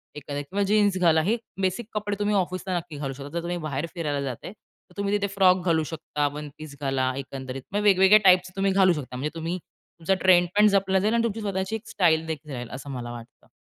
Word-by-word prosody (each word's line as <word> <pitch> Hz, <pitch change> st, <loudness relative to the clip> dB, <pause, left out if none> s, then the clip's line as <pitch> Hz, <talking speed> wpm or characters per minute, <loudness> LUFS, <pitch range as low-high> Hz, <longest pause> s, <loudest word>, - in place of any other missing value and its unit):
एखादा 145 Hz, 0 st, -5 dB
किंवा 195 Hz, +8 st, -2 dB
जीन्स 205 Hz, -2 st, +3 dB
घाला 160 Hz, -3 st, +4 dB
हे 225 Hz, +6 st, +1 dB, 0.2 s
बेसिक 190 Hz, +4 st, -1 dB
कपडे 205 Hz, -1 st, -2 dB
तुम्ही 205 Hz, 0 st, +1 dB
ऑफिसला 185 Hz, 0 st, -1 dB
नक्की 165 Hz, -3 st, -7 dB
घालू 135 Hz, -2 st, -4 dB
शकता. 140 Hz, +1 st, -9 dB
जर 170 Hz, +2 st, -3 dB
तुम्ही 175 Hz, +1 st, -3 dB
बाहेर 140 Hz, +3 st, -2 dB
फिरायला 150 Hz, -5 st, -2 dB
जाताय 135 Hz, +6 st, -5 dB
तर -, -, -29 dB
तुम्ही 200 Hz, 0 st, -1 dB
तिथे 200 Hz, 0 st, -1 dB
फ्रॉक 185 Hz, -2 st, +4 dB
घालू 160 Hz, -2 st, +2 dB
शकता 150 Hz, -1 st, -2 dB
वन 150 Hz, 0 st, -6 dB
पीस 155 Hz, -2 st, -10 dB
घाला 135 Hz, -2 st, 0 dB
एकंदरीत. 135 Hz, -1 st, -6 dB
मग 205 Hz, -, +1 dB
वेगवेगळ्या 195 Hz, 0 st, +6 dB
टाईप्सचे 180 Hz, -1 st, +5 dB
तुम्ही 195 Hz, 0 st, +1 dB
घालू 190 Hz, -2 st, +4 dB
शकता. 135 Hz, -5 st, -6 dB
म्हणजे 150 Hz, +5 st, -4 dB
तुम्ही 165 Hz, +2 st, -3 dB
तुमचा 170 Hz, +2 st, -5 dB
ट्रेंडपण 185 Hz, +3 st, +5 dB
जपला 195 Hz, -1 st, +2 dB
जाईल 215 Hz, +4 st, +1 dB
आणि 235 Hz, 0 st, +2 dB
तुमची 225 Hz, -1 st, -2 dB
स्वतःची 190 Hz, 0 st, -2 dB
एक 225 Hz, +1 st, -8 dB
स्टाईल 165 Hz, -5 st, +2 dB
देखील 150 Hz, -2 st, -6 dB
राहील, 120 Hz, -2 st, -6 dB
असं 135 Hz, +2 st, -8 dB
मला 120 Hz, -2 st, -5 dB
वाटतं. 120 Hz, -1 st, -12 dB
175 Hz, 215 wpm, -25 LUFS, 145-195 Hz, 0.2 s, वेगवेगळ्या